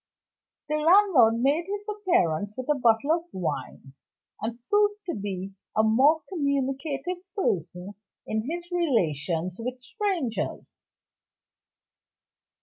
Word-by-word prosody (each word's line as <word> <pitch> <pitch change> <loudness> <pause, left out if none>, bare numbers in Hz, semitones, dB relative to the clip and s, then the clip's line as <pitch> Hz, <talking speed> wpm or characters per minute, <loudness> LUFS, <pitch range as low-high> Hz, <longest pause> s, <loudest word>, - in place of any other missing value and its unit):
The 305 +1 0
landlord 315 - +5
made 300 +6 +2
his 410 +1 -5
appearance 345 - +1
with 255 - -5
a - - +6
bottle 235 +4 +3
of 335 +1 +1
wine 165 -6 -5 0.5
and 225 +2 -3
proved 415 0 +2
to 345 - -2
be 195 -2 -5 0.2
a 220 - +5
more 270 +9 +4
communicative 280 +1 -1 0.2
person 180 - -2 0.3
in 220 +4 -2
his 345 +2 -5
relations 180 - 0
with 250 +2 -4
strangers. 335 - -3
270 Hz, 110 wpm, -26 LUFS, 210-345 Hz, 0.5 s, a